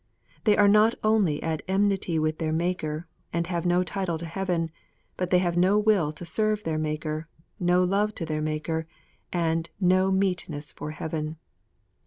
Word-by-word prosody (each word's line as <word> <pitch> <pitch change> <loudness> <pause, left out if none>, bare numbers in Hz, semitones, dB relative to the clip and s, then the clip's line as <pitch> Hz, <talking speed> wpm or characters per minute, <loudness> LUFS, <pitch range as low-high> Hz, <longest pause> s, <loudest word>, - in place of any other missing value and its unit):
They 210 -2 +5
are 205 - +6
not 215 +3 +5
only 210 -9 +2
at 160 -1 -1
enmity 190 -3 +1
with 155 0 0
their 160 -2 -1
Maker, 160 -1 -1 0.3
and 170 0 0
have 175 0 -2
no 175 +1 +3
title 185 -3 -2
to 170 - -6
heaven, 170 -1 -1 0.4
but 180 -1 -2
they 180 - +5
have 175 -1 +1
no 185 +4 +4
will 210 -8 +3
to 175 - -8
serve 215 +4 0
their 155 -1 -1
Maker, 155 +1 -3 0.3
no 180 0 +3
love 205 +3 +1
to 165 - -4
their 155 -1 -2
Maker, 155 +1 -2 0.4
and 165 -1 0
no 185 0 +3
meetness 180 -6 -1
for - - -6
heaven. 155 0 -4
175 Hz, 170 wpm, -26 LUFS, 160-190 Hz, 0.4 s, are